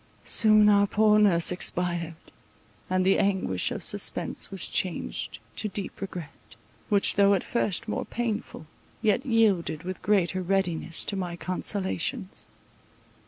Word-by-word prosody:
Soon 215 -1 +5
our 200 -1 +4
poor 210 +1 +3
nurse 180 -6 +4
expired; 175 -2 0 0.7
and 185 0 +1
the 195 - +3
anguish 190 - 0
of - - -5
suspense - - +2
was - - 0
changed - - -3 0.2
to - - -2
deep 200 -1 -6
regret, 180 -5 -9 0.3
which 200 -3 +2
though 200 0 +5
at 190 - -2
first 230 -1 -2
more 215 - -3
painful, 225 -8 -4 0.4
yet 220 +3 +2
yielded 210 - +1
with 185 +1 -6
greater 185 -2 +1
readiness 175 -3 -1
to 200 - -4
my 180 -3 -4
consolations. 190 +3 -3
195 Hz, 130 wpm, -26 LUFS, 175-210 Hz, 0.7 s, Soon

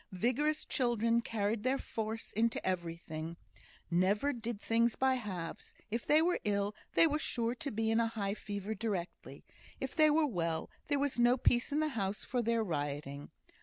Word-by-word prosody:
Vigorous 285 - +1
children 235 -2 +2
carried 215 -1 -1
their 255 +4 +1
force 225 -3 -4
into 225 +2 +2
everything; 170 -2 -3 0.5
never 200 +11 +2
did 235 -3 -4
things 230 +1 +2
by 265 0 +3
halves; 190 -9 -5 0.2
if 230 +2 -2
they 310 +2 +5
were 355 +1 +2
ill, 200 0 0 0.2
they - - +6
were 305 -1 +1
sure 235 -5 -1
to 280 +3 -4
be 225 -1 0
in 225 - +3
a 230 - +3
high 205 -3 -2
fever 205 0 -4
directly; 200 -5 -4 0.3
if 265 - -4
they 310 -1 +6
were 305 +1 +4
well, 170 - -2 0.2
there 290 - +2
was 280 -3 0
no 240 +1 +5
peace 240 +1 +2
in 295 +2 +2
the 310 - +1
house 200 -6 -2
for 250 -1 0
their 230 0 +1
rioting. 145 -4 -3
225 Hz, 175 wpm, -33 LUFS, 195-255 Hz, 0.5 s, they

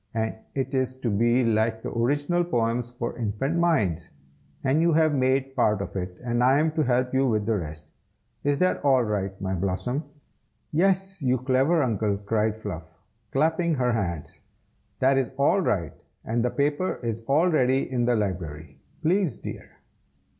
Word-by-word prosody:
And 110 0 0 0.2
it 135 0 -2
is 130 -1 0
to 115 - 0
be 120 +5 +3
like 110 0 +1
the - - -4
Original 145 +9 +1
Poems 120 -6 -1
for 120 -1 -5
Infant 120 +9 -1
Minds; 100 - +1 0.5
and 140 +4 +2
you 170 0 +3
have 155 -1 +3
made 135 0 +1
part 105 -5 +2
of 100 - -6
it, 90 -1 -4
and 120 0 0
I 130 +2 +5
am 155 +1 +2
to 155 0 0
help 125 0 +1
you 135 0 +3
with 110 -3 0
the 110 0 +1
rest. 75 -1 -8 0.5
Is 145 0 +1
that 185 +3 +1
all 135 -3 +4
right, 100 -3 -2
my 95 -1 -2
Blossom?" 100 - -2 0.7
"Yes, 190 +2 +1
you 130 -1 +2
clever 135 +6 +2
Uncle!" 105 -4 0
cried 105 +1 -1
Fluff, 85 -7 -7 0.3
clapping 160 +3 +1
her 125 -2 +1
hands. 85 -9 -3 0.6
"That 135 +1 +3
is 130 -4 -1
all 145 +8 +3
right, 85 - -1 0.3
and 115 +1 0
the 125 - +2
paper 145 +7 -1
is 115 -1 -2
all 155 +6 +3
ready 130 -3 +2
in 125 -2 0
the 120 0 +2
library, 80 -8 -4 0.2
please, 175 - +1
dear." - - -8
125 Hz, 170 wpm, -25 LUFS, 105-145 Hz, 0.7 s, I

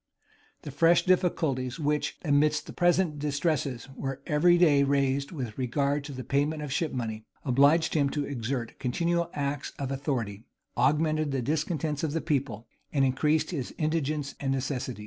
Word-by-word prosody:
The 145 - -6
fresh 165 +5 +4
difficulties 160 -8 +1
which, 150 0 -1
amidst 150 +1 +2
the - - -9
present 175 -3 +2
distresses, 145 -4 -1
were 135 -1 -4
every 175 +4 +4
day 155 -5 +5
raised 140 0 +1
with 125 -10 -5
regard 140 +3 0
to 145 - -7
the 130 -1 -6
payment 145 +5 0
of 140 -3 -4
ship 160 +1 0
money, 110 -3 -4 0.2
obliged 140 +5 +4
him 145 -3 +2
to 145 0 -2
exert 120 -2 -4
continual 170 +6 0
acts 140 -1 -3
of 135 -1 -3
authority, 120 -6 -3 0.3
augmented 155 +2 +2
the 135 -2 -1
discontents 155 +1 -1
of 155 -2 -1
the 165 - 0
people, 125 -7 -2 0.3
and 135 -2 +3
increased 150 +6 +1
his 140 -8 -4
indigence 155 -2 -1
and 135 -1 -1
necessities. 130 -2 -2
145 Hz, 160 wpm, -28 LUFS, 130-155 Hz, 0.3 s, day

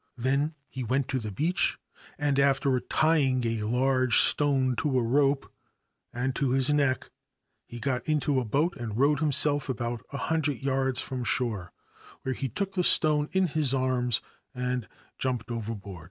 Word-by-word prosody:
Then 140 +5 0
he 130 - -6
went 130 +3 0
to 130 - 0
the 110 -3 -5
beach, 160 - 0 0.4
and, 145 -3 +1
after 135 -1 +3
tying 135 -5 +2
a 115 -1 -1
large 130 +3 +2
stone 135 -3 +2
to 150 -5 +1
a 125 - +2
rope 135 +3 +1 0.6
and 125 +2 -2
to 140 - +1
his 135 +2 +2
neck, 140 -3 +1 0.6
he 120 - -8
got 130 +2 -2
into 145 -3 +2
a - - -1
boat 150 +10 +1
and 110 -3 -5
rowed 140 +2 +3
himself 145 -1 +2
about 120 -1 -3
a 140 - -4
hundred 150 -4 -1
yards 135 -1 +1
from 130 -2 -4
shore, 110 -7 -1 0.5
where 130 - -1
he 135 +1 -3
took 195 +4 -3
the 185 -2 +1
stone 150 -3 +3
in 190 0 +2
his 150 -5 +1
arms 125 -3 +1 0.3
and 125 -1 -2 0.3
jumped 125 -2 -2
overboard. 105 -5 -5
130 Hz, 165 wpm, -28 LUFS, 125-145 Hz, 0.6 s, after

